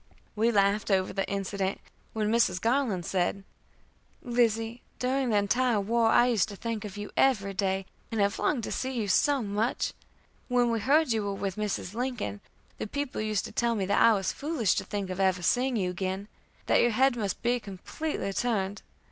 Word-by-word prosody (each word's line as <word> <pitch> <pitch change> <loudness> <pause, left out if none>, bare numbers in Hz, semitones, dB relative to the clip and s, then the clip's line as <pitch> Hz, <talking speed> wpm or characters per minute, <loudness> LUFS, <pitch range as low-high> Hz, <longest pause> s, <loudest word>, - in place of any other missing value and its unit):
We 225 +2 +3
laughed 200 0 +2
over 190 -2 +1
the 195 0 -2
incident, 195 0 -2 0.3
when 215 -1 0
Mrs. 225 -6 +2
Garland 225 -6 0
said: 195 +1 -1 0.8
"Lizzie, 235 -1 0 0.2
during 260 0 0
the 215 - +3
entire 235 +3 +2
war 225 +3 +2
I 240 - +5
used 230 -4 +2
to 205 - -7
think 225 +1 -4
of 210 -1 -7
you 205 0 -6
every 205 -7 +2
day, 190 0 -1 0.3
and 225 - -2
have 200 0 +1
longed 250 -6 +1
to - - -4
see 260 - -2
you 225 -5 -2
so 275 +7 +3
much. 210 +3 -1 0.5
When 245 -2 +2
we 230 - 0
heard 285 +5 +3
you 220 -1 +1
were 200 -1 -2
with 195 -1 -3
Mrs. 210 -3 -3
Lincoln, 235 - -3 0.4
the - - -3
people 285 0 -3
used 215 -2 -1
to - - -8
tell 235 -1 +1
me 200 -3 -1
that 200 +2 +2
I 230 - +7
was 195 -3 -1
foolish 290 - 0
to - - 0
think 200 -3 -4
of 185 - -5
ever 185 -2 +2
seeing 250 +7 +2
you 185 -4 0
again 190 +2 -3 0.4
that - - +4
your 240 - +4
head 260 +3 +3
must 205 -5 -3
be 245 +1 +2
completely 200 - -4
turned. 205 -4 -1
215 Hz, 195 wpm, -28 LUFS, 195-240 Hz, 0.8 s, I